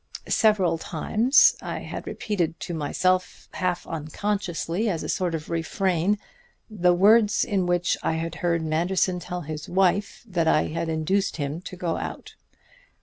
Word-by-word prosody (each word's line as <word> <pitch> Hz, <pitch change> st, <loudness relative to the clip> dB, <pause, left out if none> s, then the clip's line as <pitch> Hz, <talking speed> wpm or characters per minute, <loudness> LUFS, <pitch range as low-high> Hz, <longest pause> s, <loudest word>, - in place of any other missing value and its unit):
"Several 200 Hz, -7 st, +3 dB
times 225 Hz, -, +3 dB
I -, -, -5 dB
had -, -, -7 dB
repeated 170 Hz, -6 st, -2 dB
to 175 Hz, -, -4 dB
myself 180 Hz, +4 st, 0 dB
half 180 Hz, -2 st, -1 dB, 0.3 s
consciously, 200 Hz, 0 st, -1 dB
as 170 Hz, -5 st, -2 dB
a -, -, -4 dB
sort 180 Hz, -3 st, 0 dB
of 160 Hz, 0 st, -6 dB
refrain, 175 Hz, +3 st, 0 dB, 0.5 s
the 180 Hz, -4 st, +3 dB
words 210 Hz, +3 st, +5 dB
in 195 Hz, -5 st, 0 dB
which 175 Hz, 0 st, +1 dB
I -, -, 0 dB
had 165 Hz, +1 st, -3 dB
heard 170 Hz, -2 st, +1 dB
Manderson 180 Hz, +3 st, +1 dB
tell 180 Hz, 0 st, -5 dB
his 155 Hz, -1 st, -6 dB
wife 190 Hz, +2 st, +1 dB
that 170 Hz, -5 st, 0 dB
I 155 Hz, -, +3 dB
had 165 Hz, +1 st, -3 dB
induced 170 Hz, +6 st, 0 dB
him 145 Hz, +2 st, -3 dB
to 185 Hz, -, -8 dB
go 170 Hz, -2 st, -2 dB
out. -, -, -6 dB
180 Hz, 150 wpm, -25 LUFS, 165-195 Hz, 0.5 s, words